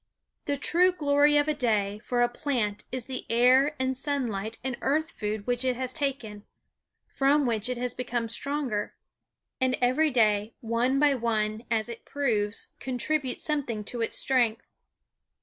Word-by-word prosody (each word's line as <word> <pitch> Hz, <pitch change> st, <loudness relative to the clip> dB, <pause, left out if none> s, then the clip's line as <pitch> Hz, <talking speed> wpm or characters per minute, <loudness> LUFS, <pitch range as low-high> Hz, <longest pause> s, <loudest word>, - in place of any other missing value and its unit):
The 285 Hz, -1 st, -1 dB
true 355 Hz, +6 st, +4 dB
glory 295 Hz, -3 st, +3 dB
of 290 Hz, 0 st, +3 dB
a 305 Hz, -, +2 dB
day 210 Hz, -7 st, 0 dB
for 240 Hz, +2 st, 0 dB
a -, -, +4 dB
plant 240 Hz, -5 st, -2 dB
is 255 Hz, -2 st, -3 dB
the 260 Hz, -1 st, -5 dB
air 255 Hz, +5 st, +4 dB
and 260 Hz, 0 st, -1 dB
sunlight 235 Hz, -7 st, -3 dB
and 260 Hz, -2 st, -2 dB
earth 315 Hz, +4 st, 0 dB
food 210 Hz, -1 st, -4 dB
which 245 Hz, 0 st, 0 dB
it 255 Hz, -1 st, +1 dB
has 255 Hz, 0 st, -3 dB
taken, 260 Hz, -9 st, -3 dB, 0.6 s
from 280 Hz, +1 st, +2 dB
which 225 Hz, -1 st, 0 dB
it 250 Hz, -, -2 dB
has 245 Hz, 0 st, -1 dB
become 240 Hz, -2 st, -3 dB
stronger. 255 Hz, -3 st, -1 dB, 0.6 s
And 260 Hz, -1 st, +1 dB
every 255 Hz, +6 st, +3 dB
day, 215 Hz, -4 st, +2 dB
one 235 Hz, +3 st, 0 dB
by 290 Hz, 0 st, +4 dB
one, 220 Hz, -2 st, -1 dB
as 225 Hz, -1 st, +1 dB
it 235 Hz, -1 st, -8 dB
proves, 225 Hz, -7 st, -1 dB
contributes 260 Hz, +1 st, -2 dB
something 265 Hz, -8 st, -1 dB
to 235 Hz, +3 st, -4 dB
its 225 Hz, -, -1 dB
strength. 240 Hz, -4 st, +1 dB
250 Hz, 160 wpm, -27 LUFS, 225-280 Hz, 0.6 s, true